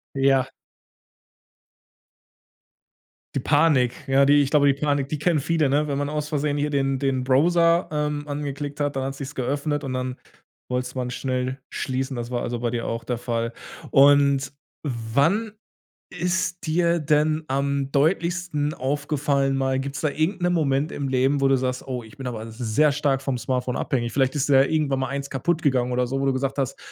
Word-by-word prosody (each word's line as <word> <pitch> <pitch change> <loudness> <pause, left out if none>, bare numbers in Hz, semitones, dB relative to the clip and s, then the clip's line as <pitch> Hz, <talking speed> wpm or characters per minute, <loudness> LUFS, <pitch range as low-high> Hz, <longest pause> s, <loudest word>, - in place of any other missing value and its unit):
Ja. 135 -1 +3 2.9
Die - - +1
Panik, 145 -4 +3
ja, 135 +1 +4
die 145 0 +5
ich 135 - -3
glaube, 145 -2 +4
die 140 - +5
Panik, 145 -2 0
die 155 - -2
kennen 155 0 +1
viele, 160 0 +1
ne? 145 +3 +1
Wenn 140 -1 -1
man 145 0 -1
aus 150 0 -3
Versehen 145 -1 0
hier 145 +1 0
den 135 -2 0
den 135 -2 0
Browser, 170 +6 +3
ähm, 150 -1 -2
angeklickt 145 0 -4
hat, 145 -1 -1
dann 135 - -1
hat 135 0 -4
sich's 140 +1 -7
geöffnet, 145 +3 -2
und 130 -1 -4
dann 130 0 -3 0.5
wollte 125 0 -1
es 125 - -8
man 125 -1 -2
schnell 130 +1 -2
schließen. 130 0 -3
Das 120 0 -4
war 120 -1 -2
also 120 -1 -3
bei 120 -1 -1
dir 115 0 -3
auch 115 0 -3
der 125 -1 -2
Fall. 115 -1 -2 0.4
Und 140 0 +4 0.3
wann 140 - 0 0.6
ist 180 0 -2
dir 170 +1 +2
denn 155 +1 +1
am 140 0 -1
deutlichsten 165 0 0
aufgefallen 140 0 0
mal 135 0 0
gibt's 140 +1 -5
da 155 - +1
irgend 165 +6 -1
'nen 175 0 +2
Moment 145 -2 +1
im 140 -1 -3
Leben, 135 +2 +1
wo 135 - +4
du 135 - +4
sagst: 125 +1 -3
„Oh, 125 -2 -4
ich 110 +6 -15
bin 135 -2 -7
aber 115 -2 -5
sehr 125 +6 +1
stark 140 -2 0
vom 135 -2 -2
Smartphone 125 +1 -2
abhängig”? 120 -6 -1
Vielleicht 135 0 +1
ist 145 0 0
dir 135 - +5
ja - - +3
irgendwann 145 -4 +1
mal 130 - -1
eines 140 0 -4
kaputtgegangen 135 -4 0
oder 125 0 +1
so, 135 +2 -2
wo - - 0
du 135 - +3
gesagt 135 +1 -2
hast: 135 0 -2
140 Hz, 190 wpm, -24 LUFS, 130-150 Hz, 2.9 s, die